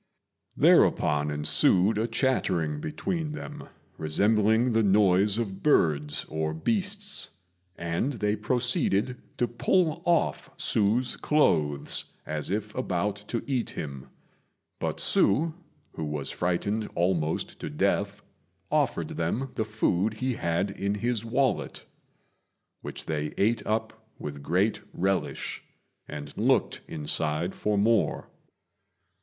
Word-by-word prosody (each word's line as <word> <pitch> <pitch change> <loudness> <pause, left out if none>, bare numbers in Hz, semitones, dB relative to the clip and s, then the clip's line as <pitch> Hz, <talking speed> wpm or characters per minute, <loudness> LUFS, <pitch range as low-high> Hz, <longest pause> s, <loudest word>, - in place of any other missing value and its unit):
Thereupon 75 0 +4
ensued 90 +7 +3
a 115 - +1
chattering 95 - 0
between 155 - -3
them, 150 -1 -8 0.3
resembling 105 +8 +3
the 115 0 +3
noise 100 0 +4
of 100 -5 -3
birds 75 - +2
or 80 0 -2
beasts, 200 - 0 0.5
and 85 +11 -1
they 105 -3 0
proceeded 120 0 0 0.2
to 120 - +1
pull 160 +7 +1
off 170 -2 +1
Hsü's 115 +4 +1
clothes 75 - +1
as 75 -1 -2
if 105 +2 -2
about 100 -4 -1
to 115 - -2
eat 130 -4 -1
him; 70 -4 -6 0.7
but - - -2
Hsü, 155 +11 +3 0.4
who 80 - -5
was 75 -2 -2
frightened 100 +5 -1
almost 85 -3 0
to - - -5
death, - - 0 0.5
offered - - +1
them 120 +11 -2
the 110 - -1
food 110 -1 0
he 130 +3 -1
had 85 0 -1
in 100 +1 -2
his 115 +1 -1
wallet, 125 +3 -1 1.0
which - - -7
they 75 -1 -3
ate 110 +4 +2
up 110 0 -2
with 70 -1 -6
great 90 +9 +1
relish, 95 +1 -1 0.5
and 75 -1 -7
looked - - +1
inside 80 +2 -1
for 105 -1 -1
more. 110 +1 +1
105 Hz, 115 wpm, -27 LUFS, 80-120 Hz, 1.0 s, Thereupon